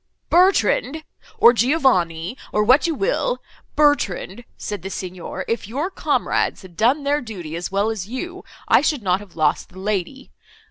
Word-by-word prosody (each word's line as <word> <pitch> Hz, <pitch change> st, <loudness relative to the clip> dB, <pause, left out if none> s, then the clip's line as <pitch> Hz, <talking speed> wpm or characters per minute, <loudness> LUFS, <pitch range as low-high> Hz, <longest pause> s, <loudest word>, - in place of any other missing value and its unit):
Bertrand, 335 Hz, -4 st, +3 dB, 0.3 s
or 235 Hz, -, +7 dB
Giovanni—or 215 Hz, -, +1 dB
what 255 Hz, +9 st, +4 dB
you 330 Hz, -, -1 dB
will—'Bertrand,' 290 Hz, -, -1 dB
said 205 Hz, -3 st, -5 dB
the 190 Hz, -, -6 dB
Signor, 185 Hz, 0 st, -6 dB
'if 230 Hz, -3 st, -2 dB
your 285 Hz, -, -3 dB
comrades -, -, 0 dB
had 180 Hz, -2 st, -14 dB
done 250 Hz, -, +2 dB
their 290 Hz, +1 st, +1 dB
duty, 180 Hz, -9 st, -7 dB
as 175 Hz, +2 st, -4 dB
well 200 Hz, +3 st, +1 dB
as 200 Hz, -4 st, -5 dB
you, 350 Hz, -, -6 dB, 0.2 s
I -, -, +5 dB
should 290 Hz, -5 st, 0 dB
not 185 Hz, -1 st, +2 dB
have 205 Hz, -3 st, -14 dB
lost 155 Hz, -2 st, 0 dB
the 185 Hz, -, -16 dB
lady. 205 Hz, +6 st, -3 dB
225 Hz, 150 wpm, -21 LUFS, 185-290 Hz, 0.3 s, or